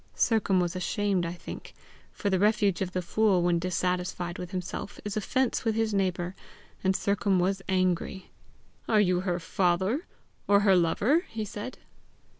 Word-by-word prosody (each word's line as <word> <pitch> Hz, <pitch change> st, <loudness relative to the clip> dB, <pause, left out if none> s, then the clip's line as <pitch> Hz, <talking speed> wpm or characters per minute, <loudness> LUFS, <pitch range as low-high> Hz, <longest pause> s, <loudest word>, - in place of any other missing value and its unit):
Sercombe 215 Hz, -5 st, +2 dB
was, 175 Hz, +1 st, -3 dB
ashamed, 190 Hz, -1 st, 0 dB
I 170 Hz, -, -4 dB
think; 175 Hz, -, -9 dB, 0.4 s
for 200 Hz, -, -2 dB
the 190 Hz, -, +2 dB
refuge 205 Hz, -2 st, +2 dB
of 185 Hz, -1 st, -1 dB
the 185 Hz, -, -1 dB
fool 195 Hz, -1 st, +2 dB
when 175 Hz, -1 st, +2 dB
dissatisfied 180 Hz, 0 st, -2 dB
with 180 Hz, -1 st, -5 dB
himself, 185 Hz, +1 st, -5 dB
is 205 Hz, -, -3 dB
offence 250 Hz, +4 st, 0 dB
with 225 Hz, -2 st, 0 dB
his 225 Hz, -1 st, 0 dB
neighbour, 185 Hz, -2 st, 0 dB, 0.5 s
and 190 Hz, 0 st, +2 dB
Sercombe 200 Hz, -1 st, +1 dB
was 190 Hz, +2 st, 0 dB
angry. 185 Hz, 0 st, 0 dB, 0.6 s
"Are 215 Hz, -, +4 dB
you 180 Hz, -3 st, +3 dB
her 180 Hz, -1 st, -1 dB
father 190 Hz, -, 0 dB, 0.4 s
or 200 Hz, 0 st, +5 dB
her 195 Hz, -2 st, +5 dB
lover?" 215 Hz, -, +2 dB
he 220 Hz, -1 st, -4 dB
said. 210 Hz, +5 st, -7 dB
190 Hz, 160 wpm, -28 LUFS, 180-210 Hz, 0.6 s, or